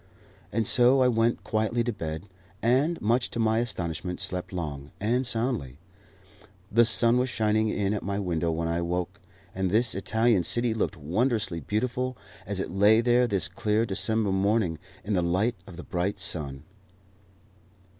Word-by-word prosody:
And 115 Hz, +1 st, 0 dB
so 130 Hz, +4 st, +5 dB
I -, -, +4 dB
went 115 Hz, -1 st, +1 dB
quietly 110 Hz, +2 st, 0 dB
to 120 Hz, 0 st, -2 dB
bed, 80 Hz, -4 st, -5 dB, 0.4 s
and, 135 Hz, +9 st, +2 dB
much 115 Hz, +3 st, +1 dB
to -, -, -5 dB
my 110 Hz, 0 st, +2 dB
astonishment, 90 Hz, -6 st, -3 dB
slept 95 Hz, -2 st, -2 dB
long 75 Hz, -6 st, -5 dB
and 120 Hz, +5 st, 0 dB
soundly. 115 Hz, -, -1 dB, 0.9 s
The 115 Hz, +2 st, +5 dB
sun 115 Hz, +2 st, +4 dB
was 130 Hz, +1 st, 0 dB
shining 110 Hz, -2 st, +1 dB
in 100 Hz, -1 st, 0 dB
at 105 Hz, -, -2 dB
my 100 Hz, 0 st, -3 dB
window 85 Hz, -4 st, -1 dB
when 80 Hz, 0 st, -1 dB
I 85 Hz, 0 st, -1 dB
awoke, 85 Hz, +1 st, -3 dB, 0.3 s
and 95 Hz, -1 st, -1 dB
this 110 Hz, +5 st, +2 dB
Italian 110 Hz, +2 st, +2 dB
city 120 Hz, +3 st, +1 dB
looked 105 Hz, -3 st, -2 dB
wondrously 100 Hz, -, -1 dB
beautiful 125 Hz, +5 st, -2 dB, 0.3 s
as 100 Hz, -1 st, -3 dB
it -, -, -3 dB
lay 105 Hz, +4 st, +5 dB
there 120 Hz, +1 st, +3 dB
this 95 Hz, -8 st, 0 dB
clear 110 Hz, -1 st, 0 dB
December 105 Hz, +1 st, 0 dB
morning, 95 Hz, -3 st, +1 dB, 0.2 s
in 105 Hz, +3 st, -2 dB
the 90 Hz, -, +2 dB
light 95 Hz, +8 st, +1 dB
of 90 Hz, -, -11 dB
the 90 Hz, -, -7 dB
bright 95 Hz, +4 st, -2 dB
sun. 75 Hz, -7 st, -3 dB
105 Hz, 165 wpm, -27 LUFS, 90-115 Hz, 0.9 s, so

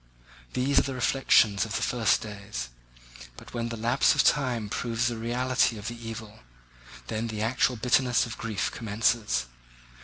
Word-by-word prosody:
These 135 Hz, +3 st, +3 dB
are -, -, +4 dB
the 135 Hz, -1 st, -4 dB
reflections 120 Hz, -5 st, +3 dB
of 115 Hz, 0 st, -4 dB
the -, -, -1 dB
first 120 Hz, -3 st, +2 dB
days; 100 Hz, -, -6 dB, 0.7 s
but -, -, -13 dB
when 115 Hz, -1 st, -2 dB
the 115 Hz, -, -5 dB
lapse 120 Hz, +4 st, +3 dB
of -, -, +4 dB
time 125 Hz, -7 st, +1 dB
proves 115 Hz, +2 st, -2 dB
the 120 Hz, -1 st, 0 dB
reality 120 Hz, +1 st, 0 dB
of 105 Hz, +1 st, -5 dB
the 120 Hz, -1 st, -7 dB
evil, 110 Hz, -1 st, -8 dB, 0.7 s
then 110 Hz, -, -3 dB
the 110 Hz, -1 st, -3 dB
actual 125 Hz, +2 st, +1 dB
bitterness 125 Hz, +1 st, +2 dB
of 115 Hz, -2 st, -7 dB
grief 105 Hz, -3 st, -2 dB
commences. 110 Hz, -, 0 dB
115 Hz, 160 wpm, -27 LUFS, 110-125 Hz, 0.7 s, are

